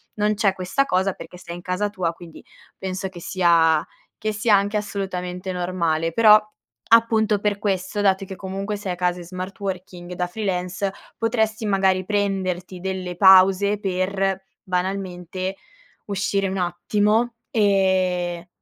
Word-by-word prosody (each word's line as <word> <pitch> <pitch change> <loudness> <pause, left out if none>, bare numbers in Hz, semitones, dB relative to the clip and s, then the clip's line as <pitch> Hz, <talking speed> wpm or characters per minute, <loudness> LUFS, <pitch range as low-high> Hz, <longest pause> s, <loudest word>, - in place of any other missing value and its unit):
non 210 0 +1
c'è 200 -2 +2
questa 190 +9 0
cosa 190 -3 +1
perché 180 - -11
sei 175 -1 -9
in 175 - -9
casa 180 +3 -1
tua, 185 -5 -1
quindi 165 -1 -13 0.3
penso 190 0 -4
che 180 - -11
sia 165 -4 +3 0.3
che 215 - -2
sia 210 0 +3
anche 200 +2 +1
assolutamente 190 -3 -4
normale. 170 -3 -1
Però 215 +1 +7 0.6
appunto 220 -2 +2
per 205 0 0
questo, 195 0 -1
dato 195 -1 +2
che 190 - -8
comunque 195 +2 -4
sei 200 -2 -4
a - - -5
casa 180 0 0
in 175 - -9
smart 185 +3 -7
working 185 -2 -6
da 180 0 -2
freelance, 185 -1 -2 0.2
potresti 220 -1 0
magari 190 -2 +2
prenderti 190 -3 -2
delle 185 -1 -4
pause 190 +2 +6
per, 195 0 -1 0.2
banalmente, 185 0 -3 0.5
uscire 200 0 -1
un 190 - -3
attimo, 210 +6 +1 0.2
ehm, 185 -4 +1
190 Hz, 140 wpm, -22 LUFS, 180-205 Hz, 0.6 s, Però